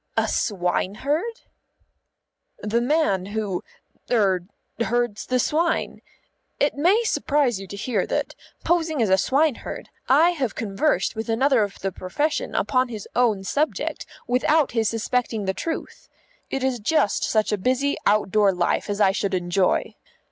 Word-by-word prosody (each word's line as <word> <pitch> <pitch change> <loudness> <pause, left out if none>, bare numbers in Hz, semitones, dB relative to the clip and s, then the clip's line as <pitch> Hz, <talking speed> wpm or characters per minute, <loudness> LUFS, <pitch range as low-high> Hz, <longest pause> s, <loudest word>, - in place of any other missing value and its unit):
"A - - +2
swineherd?" 220 - -1 1.2
"The 220 +3 -1
man 245 - +1
who 205 -3 -3 0.5
er 190 -6 +2 0.3
herds 240 -2 -1
the 255 - +1
swine. 320 +7 0 0.6
It 285 - +2
may 365 +11 +3
surprise 285 - +1
you 195 - -8
to 200 - -8
hear 210 -2 -1
that, - - -2 0.3
posing 325 -3 +1
as 205 - 0
a 190 - +6
swineherd, 280 - 0 0.2
I 315 +7 +6
have 275 -10 -2
conversed 225 +6 0
with 220 +1 -5
another 260 +2 +3
of 200 -1 -2
the 195 - -1
profession 290 - -2
upon 255 0 +1
his 220 -4 -7
own 225 -6 +2
subject, 295 +10 -2 0.2
without 275 +5 +2
his 225 -2 +1
suspecting 225 -1 -1
the 190 - 0
truth. 325 - -5 0.4
It 270 - -2
is 260 -2 0
just 220 -1 +1
such 215 -1 +1
a 210 - +1
busy 260 +7 +1
outdoor 205 0 +3
life 175 +3 0
as 205 0 -2
I 195 -2 +5
should 195 -1 -1
enjoy. 180 +1 +1
235 Hz, 145 wpm, -23 LUFS, 200-285 Hz, 1.2 s, a